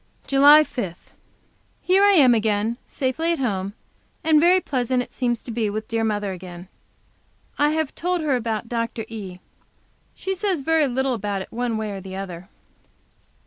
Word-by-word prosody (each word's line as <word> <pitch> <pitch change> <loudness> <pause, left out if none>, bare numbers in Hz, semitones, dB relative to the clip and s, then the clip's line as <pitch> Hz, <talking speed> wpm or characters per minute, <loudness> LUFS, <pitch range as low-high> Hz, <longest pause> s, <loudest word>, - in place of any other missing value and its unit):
JULY 290 +3 +7
5. 215 - -5 0.8
Here 380 +2 +3
I 405 0 +6
am 270 -9 +6
again, 220 +1 0
safely 285 +6 -1
at - - -2
home, 200 -6 -2 0.5
and 315 -1 +5
very 355 +4 +5
pleasant 255 -5 -1
it - - -15
seems 240 -3 -2
to 240 - -7
be 225 -2 -1
with 215 +1 -4
dear 225 0 -1
mother 205 -2 -1
again. 180 0 -9 0.9
I 295 +1 +4
have 315 -3 -1
told 360 0 -1
her 295 -4 +1
about 225 -2 -2
Dr. 230 -1 -3
E. 200 -5 -7 0.8
She 385 - -3
says 380 -4 -1
very 320 +1 +2
little 265 +1 0
about 205 -3 -3
it - - -17
one 235 -1 -2
way 215 -1 -3
or 195 -1 -6
the 190 0 -8
other. 185 -1 -7
240 Hz, 170 wpm, -23 LUFS, 205-295 Hz, 0.9 s, JULY